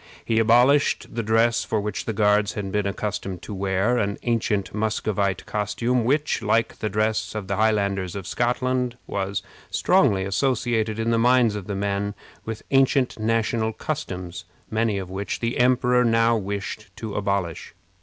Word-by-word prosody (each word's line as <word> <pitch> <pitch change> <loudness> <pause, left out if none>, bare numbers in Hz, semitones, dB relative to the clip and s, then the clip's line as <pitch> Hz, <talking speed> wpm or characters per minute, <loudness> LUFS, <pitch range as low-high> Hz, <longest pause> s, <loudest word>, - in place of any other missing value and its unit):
He 115 -1 +2
abolished 125 +7 +3
the 115 - -1
dress 115 +1 +2
which 105 -1 -1
the - - -1
Guards 105 0 +2
had 100 -2 -4
been 105 0 0
accustomed 100 -3 -4
to 105 - -6
wear 100 +5 +1
an 100 -1 -1
ancient 110 -4 0
Muscovite 105 -2 -1
costume, 115 +4 -1
which, 145 +3 +1
like 115 +1 +1
the 110 - -1
dress 110 +1 -1
of 105 -2 -3
the 100 - -1
Highlanders 100 -3 +1
of 100 -2 -5
Scotland, 125 +3 0
was 100 0 -3 0.3
strongly 95 -1 +3
associated 110 0 0
in 115 +1 0
the 115 - +2
minds 120 -2 +4
of 105 -3 -6
the 100 - -3
men 100 +1 -2 0.3
with 110 -1 -5
ancient 135 -2 +3
national 110 0 0
customs, 90 - -5 0.3
many 110 -2 +1
of 95 -2 -5
which 100 +2 -3
the 115 0 -2
emperor 125 0 +4
now 115 0 +3
wished 100 +1 -4
to 110 -3 -6
abolish. 100 -5 -2
110 Hz, 155 wpm, -24 LUFS, 100-115 Hz, 0.3 s, minds